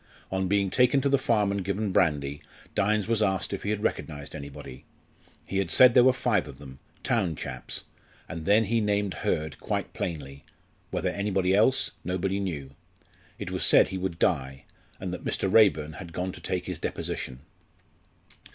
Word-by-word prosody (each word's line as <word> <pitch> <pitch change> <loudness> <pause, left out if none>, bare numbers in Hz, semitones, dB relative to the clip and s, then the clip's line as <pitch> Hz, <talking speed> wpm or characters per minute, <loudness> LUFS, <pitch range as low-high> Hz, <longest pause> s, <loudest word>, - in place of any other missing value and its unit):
On 95 0 0
being 100 0 +1
taken 125 +4 +4
to 140 - +1
the 140 -1 +3
farm 105 -6 +2
and 100 -1 -2
given 100 +2 -1
brandy, 75 -5 +1 0.3
Dynes 105 0 +1
was 115 -1 +1
asked 95 -1 0
if 100 - -3
he 100 - -3
had 105 0 -1
recognised 75 -2 -3
anybody. 70 -3 -9 0.6
He 95 - -2
had 95 -3 -1
said 125 +8 +7
there 125 - +7
were 130 - +6
five 115 - 0
of 70 -2 -10
them, 65 -2 -12 0.2
"town 105 -10 0
chaps"; - - -5 0.4
and 80 -3 -7
then 105 +3 +5
he 115 +3 0
had 110 - +1
named 100 -2 0
Hurd 75 -1 -2
quite - - -3
plainly 70 -5 -5 0.5
whether - - -1
anybody 95 -2 0
else, 120 +7 +3
nobody 95 +2 -1
knew. 75 -9 -4 0.7
It - - -6
was - - 0
said - - +6
he 95 - -4
would 90 -2 -3
die, 65 -6 0 0.4
and - - -4
that - - -6
Mr. - - 0
Raeburn 80 -9 +4
had 85 -3 -9
gone 90 +2 -2
to - - -11
take 90 -2 -2
his - - -5
deposition. 65 +1 -4
95 Hz, 180 wpm, -27 LUFS, 80-105 Hz, 0.7 s, said